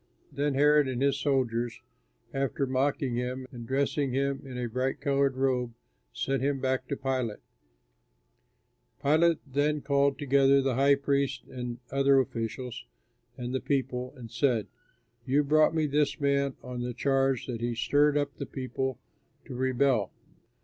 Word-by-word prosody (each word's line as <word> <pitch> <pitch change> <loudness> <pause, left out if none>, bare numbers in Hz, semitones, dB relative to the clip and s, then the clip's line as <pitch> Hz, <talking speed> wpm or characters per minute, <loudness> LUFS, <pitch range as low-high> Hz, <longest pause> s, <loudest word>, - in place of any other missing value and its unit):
Then 145 0 -1
Herod, 150 0 +5
and 130 -2 -2
his 140 0 +2
soldiers, 120 -4 0 0.5
after 135 0 -1
mocking 130 -1 0
him, 125 +1 -3
and 120 -2 -9
dressing 140 0 0
him 140 +1 0
in 130 -2 -8
a 125 -1 -2
bright 130 +4 -2
colored 140 -1 +1
robe, 125 -3 0 0.4
sent 135 -1 -1
him 140 0 0
back 130 0 -1
to 140 - -3
Pilate. 130 -5 -2 1.6
Pilate 160 +3 +3
then 145 +2 0
called 140 0 +2
together 140 -1 +4
the 135 -1 +1
high 140 +3 +4
priests 140 -1 0
and 125 -1 -5
other 135 0 +4
officials 120 - -3 0.5
and 125 0 -4
the 130 - -1
people, 130 -2 -1
and 115 -3 -10
said, 120 -4 +1 0.6
"You 140 +3 +3
brought 155 +2 +3
me 160 -1 +2
this 150 +1 +1
man 140 -1 +1
on 125 -1 -5
the 120 -1 -4
charge 135 -2 +1
that 120 -3 -5
he 120 0 -1
stirred 145 +4 +3
up 145 -1 -1
the - - -5
people 130 -1 -3 0.5
to - - -8
rebel. 130 -4 +1
135 Hz, 150 wpm, -28 LUFS, 125-140 Hz, 1.6 s, Herod